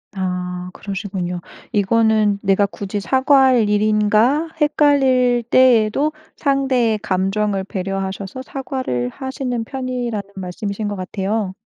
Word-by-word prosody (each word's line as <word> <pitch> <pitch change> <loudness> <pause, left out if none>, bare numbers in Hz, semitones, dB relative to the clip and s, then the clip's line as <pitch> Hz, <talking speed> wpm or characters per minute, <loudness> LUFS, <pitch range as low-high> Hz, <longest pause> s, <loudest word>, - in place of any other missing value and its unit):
아 180 -1 -3
그러시군요. 190 -3 -4 0.3
'이거는 215 -1 +2
내가 195 +1 +3
굳이 200 0 -5
사과할 260 -2 +3
일인가?' 215 +8 +2
헷갈릴 265 -5 +3
때에도 255 +3 +4 0.2
상대의 265 -6 +1
감정을 195 0 0
배려하셔서 195 +4 -4
사과를 260 - -3
하시는 255 - -4
편이라는 245 -5 -4
말씀이신 200 +3 -4
것 205 - -3
같아요. 195 +1 -2
215 Hz, 275 characters per minute, -19 LUFS, 195-255 Hz, 0.3 s, 때에도